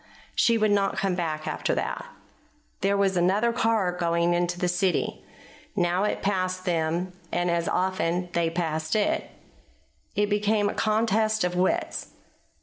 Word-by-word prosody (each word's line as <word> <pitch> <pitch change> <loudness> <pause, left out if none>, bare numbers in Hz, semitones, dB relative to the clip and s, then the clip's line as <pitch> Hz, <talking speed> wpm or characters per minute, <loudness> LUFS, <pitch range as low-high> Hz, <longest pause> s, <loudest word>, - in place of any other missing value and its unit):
She 230 -1 +3
would 215 -1 +2
not 200 -1 +1
come 195 -1 +1
back 155 -3 -3
after - - -1
that. - - -3 0.7
There 200 +1 +1
was 195 -1 +2
another 195 +7 +2
car 225 -6 +2
going 170 -1 +1
toward 175 0 +1
the 175 0 -1
city. 180 +1 0 0.5
Now 180 +1 +1
it - - -2
passed 185 -2 -1
them, 170 +1 0 0.2
and 175 0 +1
as 170 +2 0
often 180 -2 0
they 170 -1 +1
passed 160 -1 -2
it. 210 -1 +1 0.9
It 205 - +3
became 205 0 +1
a - - -3
contest 215 -1 +1
of 180 0 -1
wits. 180 +1 -1
185 Hz, 145 wpm, -26 LUFS, 175-205 Hz, 0.9 s, She